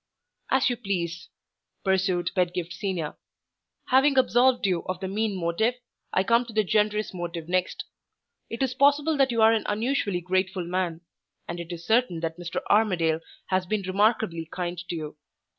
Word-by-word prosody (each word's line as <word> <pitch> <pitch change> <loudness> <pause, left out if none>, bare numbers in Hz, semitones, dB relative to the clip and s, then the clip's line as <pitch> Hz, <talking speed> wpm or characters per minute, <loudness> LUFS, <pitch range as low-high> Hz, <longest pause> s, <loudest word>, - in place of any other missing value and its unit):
"As 265 0 +3
you 245 -2 0
please," 180 -6 -3 0.5
pursued 190 -2 +1
Pedgift 180 -1 -1
Senior. 185 -5 -3 0.7
"Having 270 +2 +4
absolved 250 -1 +4
you 180 -3 +1
of 185 -1 -3
the 190 - -4
mean 210 +1 -1
motive, 180 +8 +1 0.4
I 185 - +2
come 235 +4 +3
to 235 - -10
the 215 0 +3
generous 210 +1 +1
motive 170 -2 -5
next. 185 +1 -1 0.6
It 230 +3 -2
is 260 -1 0
possible 285 +4 +3
that 270 -1 +4
you 230 -2 +2
are 220 +1 +7
an 225 - +1
unusually 210 -4 0
grateful 185 0 -1
man; 175 -2 -2 0.5
and 170 0 -5
it 170 0 -7
is 170 -1 -7
certain 220 -7 +2
that 165 +1 -3
Mr. 175 -1 -4
Armadale 180 -7 +3 0.3
has 185 -1 +1
been 210 +1 -1
remarkably 190 -3 +1
kind 175 -1 -3
to - - -2
you. 155 -2 -6
190 Hz, 165 wpm, -26 LUFS, 175-225 Hz, 0.7 s, are